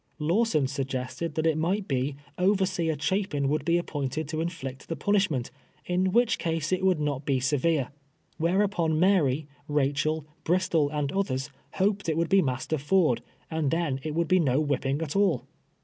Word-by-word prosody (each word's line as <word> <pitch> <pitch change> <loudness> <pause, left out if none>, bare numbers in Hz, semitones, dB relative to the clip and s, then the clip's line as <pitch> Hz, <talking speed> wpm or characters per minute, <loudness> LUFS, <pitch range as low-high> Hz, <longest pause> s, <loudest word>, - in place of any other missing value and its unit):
Lawson 165 -1 +2
suggested 135 +3 -3
that 160 - 0
it 160 -1 +2
might 190 +5 0
be, 135 0 -1 0.2
overseer 185 -4 +2
Cha 150 +6 0
pin 140 -2 -1
would 150 +1 0
be 170 +3 +2
appointed 145 -3 -3
to 155 0 -2
inflict 135 -6 -5
the 165 - -1
punishment, 160 -8 0 0.3
in 185 +1 +1
which 235 +2 +3
case 165 -1 -1
it 185 0 0
would 185 -4 +3
not 145 -2 -1
be 135 -2 +1
severe, 145 +1 +1 0.5
whereupon 170 -2 +1
Mary, 155 -6 +3 0.2
Eachel, 145 +2 0 0.2
Bristol, 165 -4 +2
and 145 -1 -2
others 140 -9 -1 0.2
hoped 200 -1 0
it 160 - 0
would 170 0 +1
be 195 0 +5
Master 135 +2 -1
Ford, 155 -3 +2 0.3
and 160 -3 0
then 160 -4 0
it 155 +2 -4
would 170 0 +1
be 185 +2 +4
no 135 -4 +2
whipping 140 0 0
at 150 -2 -5
all. 195 -9 +2
155 Hz, 170 wpm, -27 LUFS, 140-180 Hz, 0.5 s, be